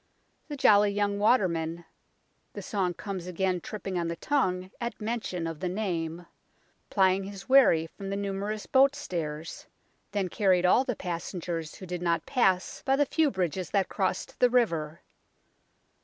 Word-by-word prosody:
The 295 -2 -6
jolly 205 -5 +5
young 200 0 0
waterman 170 -7 +1 0.7
the - - -7
song 185 -5 -1
comes 190 -3 -6
again 180 0 -1
tripping 195 -2 -4
on 170 - -1
the 170 - -3
tongue 185 -6 0
at 235 0 -4
mention 210 -6 -3
of 165 -2 -5
the 185 - -2
name 175 -4 -3 0.6
plying 190 -1 +3
his 195 -1 -9
wherry 260 -12 +6
from 195 +4 -8
the 195 - -2
numer 200 +1 -2
ous 215 -1 -5
boat 275 +1 +4
stairs, 160 - -5 0.4
then 200 -3 -1
carried 185 -1 +2
all 210 +8 +5
the 250 -3 -2
passengers 170 -2 -4
who 190 - -9
did 180 -1 -5
not 170 -2 0
pass 195 -5 +1
by 270 - +2
the 290 +1 +3
few 310 +2 +2
bridges 185 - -2
that 195 -2 +1
crossed 190 -3 -2
the 250 - +5
river. 170 -10 0
190 Hz, 160 wpm, -28 LUFS, 175-210 Hz, 0.7 s, wherry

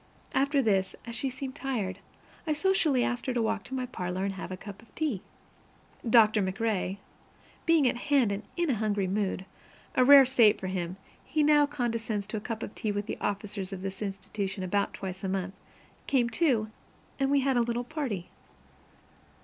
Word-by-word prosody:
After 275 +1 +2
this, 195 -4 +1
as 235 - -6
she 270 +3 -1
seemed 260 +1 -5
tired, 225 -10 -3 0.5
I 310 - +2
socially 305 -6 +2
asked 245 +1 -2
her 255 - -1
to 240 - +2
walk 220 -1 0
into 265 - -5
my 255 -1 -1
parlor 185 -6 -3
and 200 - -1
have 190 - -7
a 185 - -4
cup 200 +1 -10
of 230 - -22
tea. 290 - -1 0.9
Doctor 220 -2 +6
MacRae, 195 0 -1 0.7
being 325 -5 +5
at 245 - +1
hand 270 -4 +2
and 200 +1 -2 0.2
in 345 -4 +2
a - - +1
hungry 205 -2 0
mood 190 0 -1 0.5
(a 255 - +4
rare 275 +1 +9
state 235 -5 +5
for - - -6
him; 185 -1 -3 0.3
he 310 -1 +1
now 295 -1 +5
condescends 230 -7 -2
to 215 +2 -4
a - - -4
cup 225 +1 -4
of - - -6
tea 215 - -2
with 205 0 -2
the - - -5
officers 200 -1 -3
of 190 -1 -6
this 195 0 -5
institution 195 -1 -4
about 200 +2 0
twice 190 0 -6
a 190 - -1
month), 190 0 -2 0.5
came, 240 -3 +2
too, 225 -6 +1 0.5
and 270 0 +2
we 280 0 +4
had 265 0 +1
a 240 - +4
little 235 +1 -1
party. 245 - -4
220 Hz, 190 wpm, -29 LUFS, 195-265 Hz, 0.9 s, rare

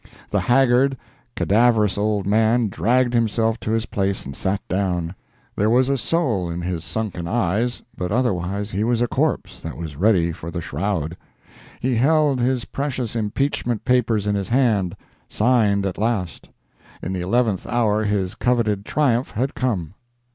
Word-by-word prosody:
] - - -23
The - - +2
haggard, 130 +1 +3 0.4
cadaverous 110 -1 +3
old 105 -1 0
man 110 +2 +3
dragged 120 +5 +1
himself 115 0 +1
to - - -5
his 115 +1 0
place 100 -2 -2
and 70 0 -7
sat 95 +4 -1
down. 90 -3 -1 0.4
There 105 +2 +2
was 125 +3 +3
a 140 - +2
soul 120 - 0
in 85 +1 -4
his 85 -2 -3
sunken 100 -4 -3
eyes, 115 +3 0
but 90 0 -3
otherwise 100 -3 -1
he 100 +3 -1
was 120 0 +1
a - - +1
corpse - - -1
that 80 - -7
was 80 -3 -6
ready 90 -3 +3
for 85 0 -7
the 85 - -4
shroud. 85 -2 -2 0.7
He 130 +1 0
held 145 +1 +3
his 125 0 0
precious 130 -5 -3
impeachment 115 0 -1
papers 115 -4 +2
in 105 - +1
his 100 -2 -2
hand, 115 -8 +2 0.3
signed 105 -4 +2
at 95 -1 -3
last! 105 -6 -2 0.5
In 95 - -3
the 90 - -2
eleventh 105 +1 0
hour 110 -3 +1
his 100 -3 -1
coveted 110 -5 0
triumph 130 -4 +1
had 130 +6 -2
come. 100 - -2
110 Hz, 160 wpm, -22 LUFS, 95-120 Hz, 0.7 s, haggard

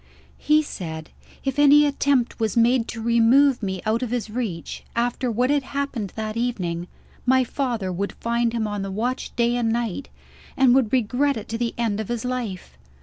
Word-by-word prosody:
"He 305 +1 +3
said, 160 - -7 0.3
if 270 +1 -2
any 290 +1 +7
attempt 280 -4 +1
was 220 -1 -1
made 235 0 +3
to 230 - -6
remove 235 +4 +4
me 190 -3 -3
out 220 +2 +1
of 250 - -2
his 230 -3 -3
reach, 215 -8 -4
after 245 +2 0
what 250 +4 +1
had 290 -1 +2
happened 265 -7 -4
that 215 -1 -4
evening, 180 -8 -2 0.4
my 260 +1 +4
father 235 -7 -2
would 195 +3 -3
find 235 0 0
him 230 -2 -1
on 205 -1 -3
the 195 - -4
watch 240 +7 -3
day 235 0 +2
and 235 -2 +1
night, 235 +2 -2 0.5
and 265 -2 +5
would 255 -4 +3
regret 260 +3 +1
it 215 - -7
to 225 - -2
the 235 -1 -2
end 225 -3 0
of 220 - -3
his 240 0 -3
life. 245 -7 -4
235 Hz, 190 wpm, -23 LUFS, 215-255 Hz, 0.5 s, any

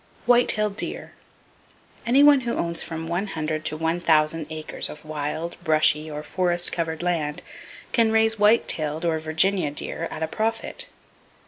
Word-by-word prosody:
White 245 0 +5
tailed 210 -1 +1
Deer.—Any 255 +4 -4
one 290 -1 +7
who 235 -1 -2
owns 170 -1 -1
from 165 0 -5
one 175 +5 -2
hundred 155 -3 -3
to 155 - +1
one 165 +2 -1
thousand 155 -1 +2
acres 155 -1 -5
of 150 - -11
wild, 155 +2 -4
brushy 155 0 +3
or 150 0 -6
forest 175 0 0
covered 165 -1 -3
land 155 -4 -1 0.5
can 230 -3 +3
raise 220 0 +3
white 210 +3 +4
tailed 155 +1 -2
(or 160 -2 +1
Virginia) 160 +2 +1
deer 160 +3 -3
at 160 - -5
a - - 0
profit. 225 +6 -2
165 Hz, 155 wpm, -24 LUFS, 155-210 Hz, 0.5 s, one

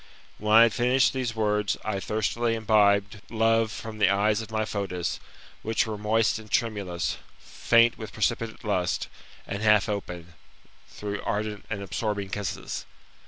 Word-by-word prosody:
When 105 0 -2
I 115 - +10
had 115 -2 +3
finished 125 +1 +3
these 125 -3 -2
words, 105 -2 0
I 105 -2 -1
thirstily 110 +3 -1
imbibed 105 -2 +2
love 115 0 +2
from 110 0 -7
the 105 - +5
eyes 105 +2 +2
of 110 - -9
my 110 0 -1
Fotis, 95 -5 -3 0.4
which 110 +2 0
were 110 -1 -4
moist 110 +2 +1
and 110 -1 -13
tremulous, 100 -8 -1 0.2
faint 115 0 +2
with 110 - -7
precipitate 115 0 -2
lust, 95 -5 -1 0.4
and 100 - -5
half 105 -2 +4
open, 90 -4 -5 0.6
through 105 -1 -5
ardent 105 0 -3
and 100 -2 -4
absorbing 100 -1 -3
kisses. 100 -1 -4
105 Hz, 150 wpm, -26 LUFS, 100-115 Hz, 0.6 s, I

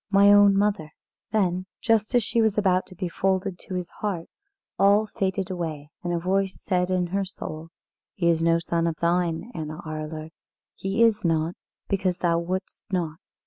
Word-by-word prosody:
my 200 0 +6
own 205 -1 +6
mother!" 200 -6 +1 0.4
Then 185 -3 +1
just 225 +1 +2
as 240 - +4
she 230 +3 +1
was 220 -2 +2
about 185 -3 +2
to 185 - -13
be 180 +1 -3
folded 190 +1 -1
to 185 - -6
his 180 -1 -3
heart, 190 -6 -2 0.5
all 200 +2 +5
faded 195 -3 -2
away, 155 -5 -4
and 175 - -2
a 175 - +1
voice 190 +2 0
said 180 -2 0
in 185 -1 +1
her 195 +3 -1
soul: 165 -4 -7 0.5
"He 175 -3 0
is 165 -1 +3
no 165 0 +4
son 170 0 0
of 165 - -1
thine, 170 +5 0
Anna 155 -3 -5
Arler. 155 0 -5 0.4
He 195 +4 0
is 225 -2 +3
not, 165 0 +1 0.3
because 185 -2 0
thou 170 -2 +2
wouldest 185 +3 -4
not. 165 -4 -2
185 Hz, 180 wpm, -25 LUFS, 170-200 Hz, 0.5 s, my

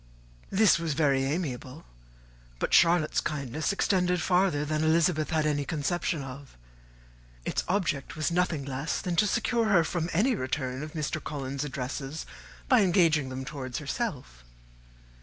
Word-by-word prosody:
This 195 -3 +4
was 165 -3 -2
very 140 -3 +2
amiable; 140 -1 -4 0.7
but - - -2
Charlotte's 170 -2 +4
kindness 150 - -2
extended 180 -2 +1
farther 180 -4 +2
than 155 +1 -1
Elizabeth 160 0 +2
had 155 -2 +1
any 145 -1 +1
conception 155 +1 -1
of: 135 - -10 0.9
its - - -1
object 170 -8 -1
was 155 +1 -1
nothing 170 -5 0
less 135 +3 -2
than 180 -2 -2
to 210 - +4
secure 235 +2 +1
her 195 -6 +4
from 170 +1 -2
any 225 +10 +2
return 130 - -3
of 155 0 -7
Mr. 155 0 -3
Collins's 140 -1 -4
addresses, 135 +2 -5 0.4
by 255 -4 +5
engaging 165 -7 +3
them 130 0 -5
towards 135 -4 -5
herself. 140 - -4
155 Hz, 140 wpm, -28 LUFS, 140-175 Hz, 0.9 s, by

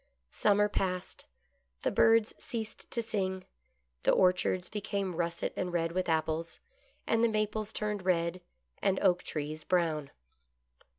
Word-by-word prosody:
Summer 210 0 +3
passed. 185 -3 -3 0.6
The - - +2
birds 225 -1 +4
ceased 225 -4 -5
to 235 - 0
sing; 190 -4 -2 0.6
the - - +1
orchards 180 0 +3
became 200 -3 -3
russet 170 0 -1
and 180 - -2
red 165 -1 0
with 185 0 -1
apples, 160 +1 -1 0.5
and 225 0 +2
the - - +6
maples 215 0 -1
turned 210 -3 -2
red, 175 -1 +1 0.4
and 190 -1 +2
oak 180 -3 +4
trees 155 0 -4
brown. 160 -6 +1
185 Hz, 130 wpm, -31 LUFS, 170-210 Hz, 0.6 s, the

